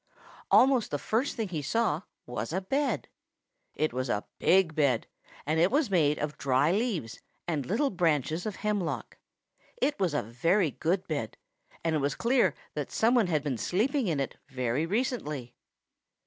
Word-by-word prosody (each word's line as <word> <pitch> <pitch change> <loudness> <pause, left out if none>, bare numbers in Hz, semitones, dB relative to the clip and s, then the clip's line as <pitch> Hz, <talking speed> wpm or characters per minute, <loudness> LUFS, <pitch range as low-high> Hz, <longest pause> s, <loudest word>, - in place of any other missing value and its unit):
Almost 260 -3 +5
the 145 - -1
first 230 - -1
thing 225 -5 -2
he 160 -4 -3
saw 170 +1 0 0.2
was 120 -1 -4
a 185 - 0
bed. 270 +9 -1 0.7
It 155 -4 0
was 130 0 -2
a 105 -2 -1
big 185 -3 +4
bed, 140 -6 +2 0.4
and 155 +2 +1
it 175 +3 +5
was 275 -2 +1
made 150 -5 +3
of 150 0 -4
dry 140 +3 +3
leaves 190 - -1 0.3
and 150 -6 -1
little 265 - +1
branches 165 - 0
of 210 - -4
hemlock. 205 -5 -2 0.6
It 295 - +1
was 180 -6 +1
a - - +1
very 160 - +1
good 180 +7 -1
bed, 145 -9 -3 0.5
and 165 -1 +1
it 155 - +2
was 140 -1 0
clear 245 +2 +2 0.2
that - - -4
some 230 +2 +3
one 235 -6 +4
had 155 -4 0
been 135 -6 -2
sleeping 230 - +1
in 160 -5 0
it 135 - -3
very 130 +3 -1
recently. 165 - -2
165 Hz, 170 wpm, -29 LUFS, 145-215 Hz, 0.7 s, Almost